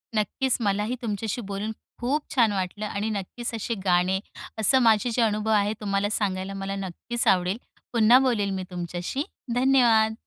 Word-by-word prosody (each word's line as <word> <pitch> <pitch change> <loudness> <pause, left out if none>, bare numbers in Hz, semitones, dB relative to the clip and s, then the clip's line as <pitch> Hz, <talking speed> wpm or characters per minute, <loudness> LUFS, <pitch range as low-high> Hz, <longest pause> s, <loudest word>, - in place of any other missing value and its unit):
नक्कीच. 230 +5 0
मला 205 0 +1
ही 250 +3 -2
तुमच्याशी 225 +1 -3
बोलून 200 +2 -4 0.3
खूप 285 +5 0
छान 230 -4 +4
वाटलं. 195 +2 -3
आणि 210 +1 -2
नक्कीच 215 +4 -4
असे 225 +2 -2
गाणे, 180 +1 +3 0.4
असं 260 +5 +4
माझे 225 0 +4
जे 235 - +1
अनुभव 215 0 +1
आहेत, 210 0 +2
तुम्हाला 200 0 0
सांगायला 195 -2 -2
मला 195 0 -4
नक्कीच 195 +5 -4
आवडेल. 185 +2 +3 0.4
पुन्हा 235 +2 +6
बोलेन 220 -7 +1
मी 185 - -3
तुमच्याशी. 175 - -3 0.3
धन्यवाद. 240 -4 +4
210 Hz, 160 wpm, -25 LUFS, 195-235 Hz, 0.4 s, पुन्हा